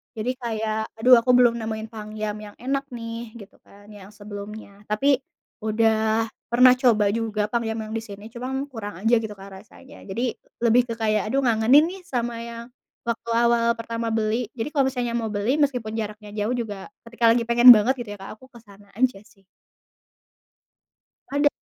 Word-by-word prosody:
Jadi 225 +3 -2
kayak, 220 -2 -3
"Aduh 250 +2 +7
aku 250 +2 +2
belum 240 -2 +5
nemuin 220 0 -4
pangyam 215 -1 -5
yang 210 -1 -11
enak 275 +3 -1
nih," 230 -1 -7
gitu 200 - -14
kan 205 +1 -19
yang 205 0 -13
sebelumnya. 205 0 -10
Tapi 270 +7 +2 0.4
udah 220 0 +1 0.2
pernah 250 +1 +7
coba 235 -5 +3
juga 215 -2 -1
pangyam 225 -2 -1
yang 220 - -7
di 225 - -2
sini 205 0 -10
cuman 265 +3 -4
kurang 205 -5 -7
aja 235 +1 +4
gitu, 220 -2 -5
Kak, 195 0 -11
rasanya. 265 +5 -16
Jadi 235 +5 -2 0.3
lebih 235 +2 +5
ke 230 - -3
kayak, 215 -2 +1
"Aduh 275 0 +1
ngangenin 235 +5 +5
nih 385 0 -10
sama 240 -4 -3
yang 235 0 -8 0.4
waktu 235 0 -3
awal 235 0 +3
pertama 230 0 -4
beli." 220 +1 0
Jadi 230 +3 -3
kalau 275 -3 +2
misalnya 245 -2 -3
mau 225 -2 -2
beli 210 +6 0
meskipun 250 -7 0
jaraknya 210 -1 -6
jauh 215 +4 -1
juga, 210 -5 -5 0.2
ketika 235 0 -7
lagi 235 0 +2
pengen 240 +1 +7
banget 220 +5 +2
gitu 235 -3 -6
ya, - - -15
Kak, 195 - -9
aku 260 - -16
ke 235 - -14
sana 200 -1 -18
aja 250 -4 +1
sih. 195 -2 -25 1.9
Ada. 290 +1 +3
225 Hz, 180 wpm, -24 LUFS, 215-240 Hz, 1.9 s, Aduh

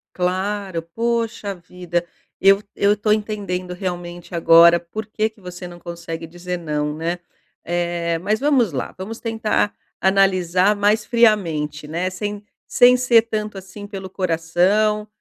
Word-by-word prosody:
Claro, 185 0 -1
poxa 225 +2 -2
vida, 175 -1 -4 0.4
eu 195 +1 +6
eu 205 +1 +3
tô 210 +1 +1
entendendo 200 -4 -2
realmente 175 -1 -6
agora 170 +1 +7
por 210 +5 -7
que 215 0 -1
que 215 - -24
você 180 0 -8
não 175 0 -11
consegue 170 -1 -7
dizer 175 +2 -5
"não", 150 -3 -2
né? 170 +2 -3 0.4
Eh, 170 -1 -1
mas 210 +6 -1
vamos 270 - +2
lá, 130 - -4
vamos 215 +5 -6
tentar 225 -2 0 0.3
analisar 190 0 +3
mais 210 +2 +2
friamente, 170 - +1
né, 170 +4 -2
sem 205 +2 -5 0.2
sem 250 +1 +6
ser 245 -2 +5
tanto 215 -2 -4
assim 195 +2 -9
pelo 195 -2 -7
coração. 190 +5 +1
185 Hz, 140 wpm, -21 LUFS, 175-210 Hz, 0.4 s, agora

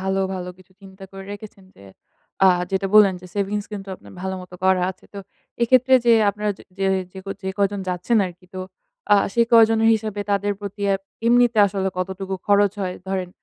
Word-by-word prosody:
ভালো, 190 0 -1
ভালো 180 -1 -5
কিছু 185 +1 -21
চিন্তা 195 0 -13
করে 195 0 -9
রেখেছেন, 205 -1 -11
যে - - -17 0.6
আ - - +8 0.2
যেটা 195 0 0
বললেন, 205 -3 +7
যে 180 - -12
সেভিংস 205 0 -2
কিন্তু 200 -1 -7
আপনার - - -16
ভালো 190 0 -3
মতো 180 0 -13
করা 190 -1 +3
আছে। 185 - -15
তো 200 - -6 0.4
এক্ষেত্রে 255 +2 +4
যে 235 - +6 0.2
আপনারা 210 +1 -3
যে - - -14 0.2
যে 195 - 0 0.3
যে 190 - -10
ক - - -51 0.2
যে 190 - -2
কয়জন 200 0 0
যাচ্ছেন 180 +6 0
আরকি, 180 0 -13
তো 185 - -5 0.5
আ - - +8 0.2
সে 235 - +3
কয়জনের 225 -1 +5
হিসাবে, 215 -2 -4
তাদের 200 0 +1
প্রতি 205 0 -7
এব 195 - -4 0.3
এমনিতে 240 -1 +4
আসলে 190 -1 -2
কতটুকু 190 +1 -4
খরচ 205 -1 +4
হয়? 180 -1 -3
ধরেন 190 -2 -2
195 Hz, 195 wpm, -22 LUFS, 190-210 Hz, 0.6 s, আ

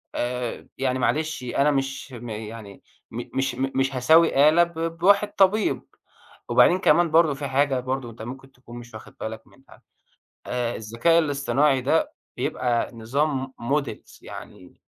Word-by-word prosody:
آآ، 125 -1 -3
يعني 130 -1 0
معلش، 155 +1 -1
أنا 140 +4 +1
مش 135 -1 -3
م 120 0 -8
يعني 110 -2 -8 0.3
م 120 +2 -5
مش 135 -2 0
م 135 +2 -2
مش 135 0 0
هساوي 150 +2 +5
آلة 170 +2 +5
ب 165 -1 -4
بواحد 200 +4 +3
طبيب. 200 +2 +2 0.6
وبعدين 180 - +5
كمان 170 -1 +3
برضه 160 -2 +4
فيه 145 - -6
حاجة 135 0 +1
برضه 130 -1 -3
أنت 110 - -13
ممكن 135 +3 -9
تكون 120 -1 -13
مش 120 -1 -13
واخد 110 - -12
بالك 110 0 -6
منها، 135 - -20 0.7
آآ 120 -1 -2
الذكاء 115 +10 +2
الاصطناعي 140 -2 +1
ده، 155 +5 +1 0.2
بيبقى 120 -2 -1
نظام 135 +3 -2
م 140 +6 +1
models، 140 - -10
يعني 90 - -12
135 Hz, 155 wpm, -24 LUFS, 120-155 Hz, 0.7 s, هساوي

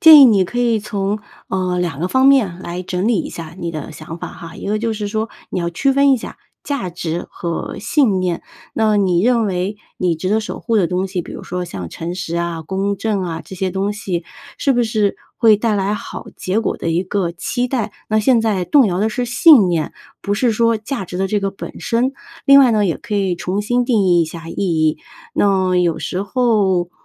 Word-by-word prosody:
建 315 -2 +10
议 275 - +10
你 205 -6 +5
可 245 +7 -5
以 235 -2 +2
从 205 0 -2 0.3
呃， 185 -1 -1
两 170 -6 -2
个 180 - 0
方 260 +4 +3
面 225 -11 +4
来 175 0 -5
整 185 +3 -1
理 225 -6 +2
一 - - -6
下 165 -1 -8
你 170 -2 -3
的 155 -2 -6
想 160 +2 -9
法 - - -6
哈。 165 -1 -10
一 - - -7
个 210 +1 0
就 230 0 -1
是 210 -1 -3
说 220 +1 -2 0.2
你 - - -2
要 170 0 -1
区 270 +11 +1
分 275 0 +4
一 - - +4
下 230 - -8 0.3
价 260 -11 -3
值 170 0 -4
和 170 -1 -4
信 220 -5 +2
念。 180 -2 -1 0.3
那 215 -1 +2
你 185 -3 +2
认 235 0 +3
为 185 +2 -2 0.2
你 180 -2 +1
值 175 +4 -3
得 220 +2 +2
守 215 - -6
护 230 -2 0
的 190 -5 +3
东 185 +2 -1
西， 185 -2 -3
比 - - -10
如 - - -8
说 180 0 -4
像 95 - -6
诚 165 - -5
实 170 -2 -4
啊、 170 -1 -2
公 195 +4 -2
正 205 -1 -1
啊， 165 -2 -4
这 190 - -10
些 190 0 -1
东 195 +2 -1
西 185 -5 -3 0.3
是 275 - +2
不 245 -2 +2
是 215 -3 0 0.2
会 220 -3 +6
带 215 0 0
来 200 +1 0
好 - - -7
结 190 +4 -1
果 - - -1
的 165 - -2
一 170 +3 +1
个 185 -2 -1
期 245 +8 -2
待？ 240 -5 -2 0.2
那 215 0 +2
现 240 +1 +4
在 205 -5 0
动 270 - +5
摇 180 -1 -1
的 215 - +2
是 245 +3 -2
信 240 - +6
念， 165 -3 -1 0.3
不 205 0 -1
是 235 +1 +2
说 230 +1 +2
价 220 0 -4
值 180 - -6
的 190 +1 0
这 205 +1 0
个 195 - -1
本 195 - -9
身。 245 +3 0 0.3
另 275 0 +8
外 260 -3 +6
呢， 215 -2 +2
也 170 - 0
可 235 -3 -5
以 195 -3 +1
重 185 +4 -2
新 245 +3 +1
定 225 -5 +3
义 175 -2 +4
一 165 - +3
下 165 +1 -8
意 - - -7
义， 160 -5 +1 0.4
那 190 -2 +2
有 175 -2 +2
时 185 +1 -3
候， 200 -6 +1
195 Hz, 255 characters per minute, -18 LUFS, 180-225 Hz, 0.4 s, 建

